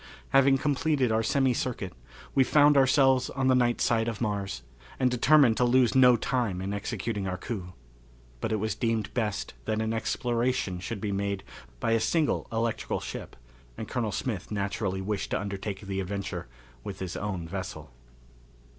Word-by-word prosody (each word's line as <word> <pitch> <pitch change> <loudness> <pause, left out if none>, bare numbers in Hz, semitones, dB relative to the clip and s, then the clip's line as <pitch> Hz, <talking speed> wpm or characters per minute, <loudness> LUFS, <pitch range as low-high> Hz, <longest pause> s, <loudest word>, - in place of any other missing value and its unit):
Having 135 0 +5
completed 140 -2 +1
our 110 0 +2
semi 130 +2 +2
circuit, 115 -7 -3 0.4
we 135 - +5
found 145 +2 +5
ourselves 135 -1 +4
on 130 -1 0
the - - +6
night 120 -1 +2
side 115 -1 +2
of 115 -3 -3
Mars, 100 - -2 0.4
and 130 -1 +3
determined 125 -1 +5
to - - +3
lose 125 0 +4
no 125 -2 +7
time 120 -6 -1
in 95 +2 -3
executing 105 -1 -3
our 90 0 -2
coup. 90 -2 -6 0.7
But 110 - -2
it - - +2
was 110 0 -1
deemed 115 -3 -1
best 110 -5 -2
that 110 - -1
an 110 0 -1
exploration 120 -4 -1
should 115 +5 -4
first - - -11
be 105 - -1
made 100 0 -2 0.4
by 115 - 0
a 115 - +4
single 150 +7 +1
electrical 115 0 -1
ship, - - -7 0.4
and 110 - -5
Colonel 115 -4 -2
Smith 100 -2 -3
naturally 100 -2 -2
wished 100 +1 -2
to - - 0
undertake 100 0 -4
the 100 -1 -4
adventure 95 - -4 0.4
with 95 - -6
his 95 -2 -5
own 95 -5 -3
vessel. 80 - -6
110 Hz, 170 wpm, -28 LUFS, 100-125 Hz, 0.7 s, no